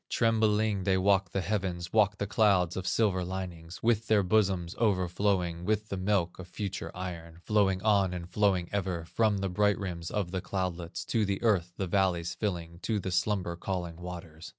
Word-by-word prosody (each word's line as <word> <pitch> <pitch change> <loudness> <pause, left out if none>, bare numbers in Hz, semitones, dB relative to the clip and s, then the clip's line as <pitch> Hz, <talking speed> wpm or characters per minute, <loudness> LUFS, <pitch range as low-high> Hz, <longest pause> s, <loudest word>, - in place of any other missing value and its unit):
Tremblingly 110 -3 +2
they 95 0 +2
walked 95 -1 +2
the 95 - -1
heavens, 90 -3 -2
Walked 105 -2 +4
the 100 - -1
clouds 100 -4 +3
with 95 0 -4
silver 95 -5 +2
linings, 90 -2 -6
With 115 -1 +2
their 105 -2 +4
bosoms 95 -3 +1
overflowing 90 -4 +1
With 105 +2 0
the 100 - -3
milk 95 -2 0
of 95 - -8
future 95 0 -4
iron, 85 -3 -6
Flowing 100 -3 +2
on 100 -4 +3
and 90 -1 -5
flowing 95 -3 +1
ever, 90 -4 -2
From 105 +5 +1
the 95 0 -1
bright 105 +2 +2
rims 85 -4 -4
of 100 -5 -2
the 95 -1 -2
cloudlets 90 -3 -3
To 115 -2 +2
the 100 -1 -1
earth, 90 -6 +2
the 95 - -1
valleys 90 -2 +1
filling, 85 -5 -3
To 110 +2 -1
the 95 -1 -4
slumber 90 -2 0
calling 85 -2 -4
waters. 90 -2 -8
95 Hz, 180 wpm, -30 LUFS, 90-105 Hz, -, Walked